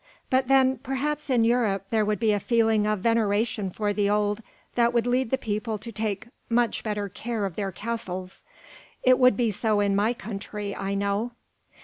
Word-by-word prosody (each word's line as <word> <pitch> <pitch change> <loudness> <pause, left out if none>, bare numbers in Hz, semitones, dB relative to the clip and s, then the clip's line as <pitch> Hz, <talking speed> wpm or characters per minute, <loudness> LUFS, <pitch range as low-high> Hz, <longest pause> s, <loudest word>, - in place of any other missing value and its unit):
But 260 0 +3
then, 265 -1 +4
perhaps 285 +3 -3
in 245 -3 +3
Europe 225 -5 +1
there 220 -1 +3
would 210 0 0
be 225 -2 +3
a 205 - +1
feeling 225 -1 +2
of 215 -2 0
veneration 220 -2 +1
for 205 +2 -1
the 205 -1 +1
old 210 +1 +1 0.3
that 235 0 +2
would 235 -1 +3
lead 250 0 +1
the 265 - +1
people 215 -1 -2
to 230 +3 -8
take 215 -1 -3 0.2
much 235 0 +1
better 210 -2 -2
care 220 +2 -3
of 190 -4 -4
their 195 -2 -2
castles. 185 -3 -5 0.6
It 255 0 +5
would 250 -5 +5
be 235 -3 +2
so 210 +1 +1
in 200 -1 +2
my 210 +4 +2
country, 205 -2 -6
I 195 0 -2
know." 200 +4 -1
215 Hz, 190 wpm, -26 LUFS, 205-240 Hz, 0.6 s, It